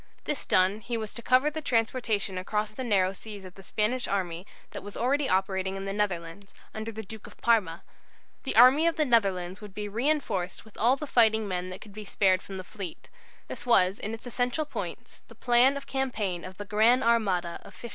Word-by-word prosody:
This 295 Hz, -, -2 dB
done, 185 Hz, +3 st, +3 dB
he 235 Hz, +3 st, -3 dB
was 220 Hz, -2 st, -5 dB
to 235 Hz, -, -8 dB
cover 255 Hz, +5 st, +3 dB
the 315 Hz, +1 st, -5 dB
transportation 225 Hz, -6 st, 0 dB
across 210 Hz, +3 st, -2 dB
the 260 Hz, -, -5 dB
narrow 195 Hz, -5 st, +2 dB
seas 205 Hz, -1 st, -9 dB
of 185 Hz, -, -10 dB
the 195 Hz, -, -13 dB
Spanish 215 Hz, +6 st, -1 dB
army 185 Hz, -2 st, -2 dB, 0.2 s
that -, -, -7 dB
was 205 Hz, 0 st, -9 dB
already 270 Hz, +3 st, +1 dB
operating 190 Hz, 0 st, 0 dB
in 195 Hz, 0 st, -5 dB
the 195 Hz, -, -3 dB
Netherlands, 195 Hz, -1 st, -3 dB, 0.2 s
under 220 Hz, +1 st, -5 dB
the 220 Hz, 0 st, -7 dB
Duke 220 Hz, +1 st, -10 dB
of -, -, -15 dB
Parma. 205 Hz, -8 st, +1 dB, 0.6 s
The 265 Hz, -, -3 dB
army 260 Hz, +8 st, +7 dB
of 335 Hz, -, +1 dB
the 310 Hz, -2 st, +2 dB
Netherlands 195 Hz, -6 st, +1 dB
would 205 Hz, -3 st, -11 dB
be 210 Hz, 0 st, -4 dB
reinforced 220 Hz, -6 st, -1 dB
with 220 Hz, -, -18 dB
all 240 Hz, +4 st, +3 dB
the 300 Hz, -, -6 dB
fighting 220 Hz, -5 st, +3 dB
men 180 Hz, -1 st, -3 dB
that 185 Hz, 0 st, -8 dB
could 210 Hz, -, -12 dB
be 215 Hz, +1 st, -7 dB
spared 190 Hz, -2 st, +2 dB
from 195 Hz, -, -8 dB
the 185 Hz, -, -6 dB
fleet. 185 Hz, -3 st, -8 dB, 0.4 s
This -, -, -8 dB
was 195 Hz, -4 st, +4 dB
in 215 Hz, +2 st, -3 dB
its 225 Hz, -, -15 dB
essential 245 Hz, +5 st, -1 dB
points -, -, -7 dB
the -, -, -15 dB
plan 250 Hz, +3 st, +4 dB
of 280 Hz, -, -8 dB
campaign 215 Hz, -10 st, -2 dB
of 185 Hz, 0 st, -10 dB
the 205 Hz, -, -6 dB
"Gran' 225 Hz, +5 st, +4 dB
Armada" 195 Hz, -7 st, +1 dB
of -, -, -14 dB
1588. 235 Hz, -, -8 dB
215 Hz, 215 wpm, -28 LUFS, 190-245 Hz, 0.6 s, army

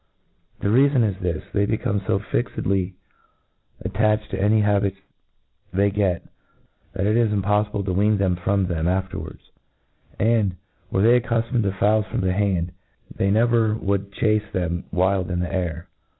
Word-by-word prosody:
The 100 Hz, -, 0 dB
reafon 130 Hz, 0 st, +4 dB
is 100 Hz, -2 st, -3 dB
jthis 90 Hz, -4 st, -3 dB
i -, -, -22 dB
they 100 Hz, 0 st, +2 dB
become 110 Hz, -1 st, 0 dB
fo 95 Hz, 0 st, 0 dB
fixedly 95 Hz, +2 st, -1 dB, 0.9 s
attached 105 Hz, +1 st, 0 dB
to -, -, -2 dB
any 105 Hz, +2 st, +4 dB
habits 100 Hz, -2 st, +1 dB, 0.7 s
they 100 Hz, +2 st, +2 dB
get, 95 Hz, -4 st, 0 dB, 0.7 s
that 95 Hz, -, -1 dB
it 105 Hz, +2 st, +2 dB
is 115 Hz, -2 st, +3 dB
impofliible 105 Hz, 0 st, 0 dB
to 95 Hz, -, -1 dB
wean 105 Hz, +3 st, +3 dB
them 95 Hz, -2 st, +1 dB
from 95 Hz, +2 st, 0 dB
them 85 Hz, -2 st, -1 dB
after 95 Hz, +1 st, -1 dB
wards; -, -, -11 dB, 0.7 s
and, 110 Hz, -4 st, +2 dB, 0.3 s
were 95 Hz, -, +1 dB
they 120 Hz, +2 st, +6 dB
accuflomied 115 Hz, +1 st, 0 dB
to 100 Hz, -2 st, 0 dB
fowls 105 Hz, +2 st, +2 dB
from -, -, -2 dB
the 95 Hz, -1 st, +1 dB
hand, 95 Hz, -3 st, 0 dB, 0.4 s
they 95 Hz, -, +1 dB
never 110 Hz, 0 st, +3 dB
would 100 Hz, -2 st, -2 dB
chace 105 Hz, 0 st, 0 dB
them 90 Hz, -1 st, -2 dB
wild 95 Hz, 0 st, +1 dB
in 90 Hz, -1 st, -1 dB
the 90 Hz, +2 st, -3 dB
air. 85 Hz, -2 st, -3 dB
100 Hz, 165 wpm, -23 LUFS, 95-105 Hz, 0.9 s, they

